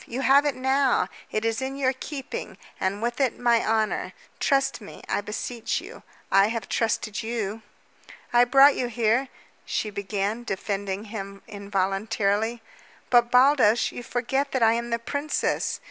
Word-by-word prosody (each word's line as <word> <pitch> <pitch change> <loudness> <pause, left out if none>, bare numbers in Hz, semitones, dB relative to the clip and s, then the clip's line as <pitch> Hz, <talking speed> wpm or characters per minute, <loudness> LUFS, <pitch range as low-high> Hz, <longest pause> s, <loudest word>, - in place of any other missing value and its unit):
You 250 +3 -4
have 275 +2 +5
it 285 - 0
now. 265 0 +2 0.2
It 215 +1 -1
is 225 +1 0
in 265 +1 -3
your 265 -1 +1
keeping, 270 +1 -6 0.2
and 200 +3 -1
with 240 +2 -2
it 260 -3 +1
my 235 -1 +3
honor. 220 -1 0 0.3
Trust 275 -3 +1
me, 205 - -11
I - - 0
beseech 220 +3 -3
you. - - -11 0.3
I 195 +1 +5
have 225 -2 -4
trusted 215 -3 -1
you." 225 -2 -3 0.7
"I 240 0 +6
brought 275 +3 +7
you 250 - -1
here 240 +2 +1 0.2
" - - -35
she 215 - -2
began, 200 +3 -2
defending 200 -1 -3
him 195 -2 -7
involuntarily. 200 +3 -1 0.5
"But, 240 -1 +5
Baldos, 250 -3 +4
you - - -7
forget 265 +4 -2
that 260 -3 +2
I 225 0 +5
am 235 +1 -2
the 235 - +1
princess!" 285 +6 -2
230 Hz, 160 wpm, -25 LUFS, 210-260 Hz, 0.7 s, brought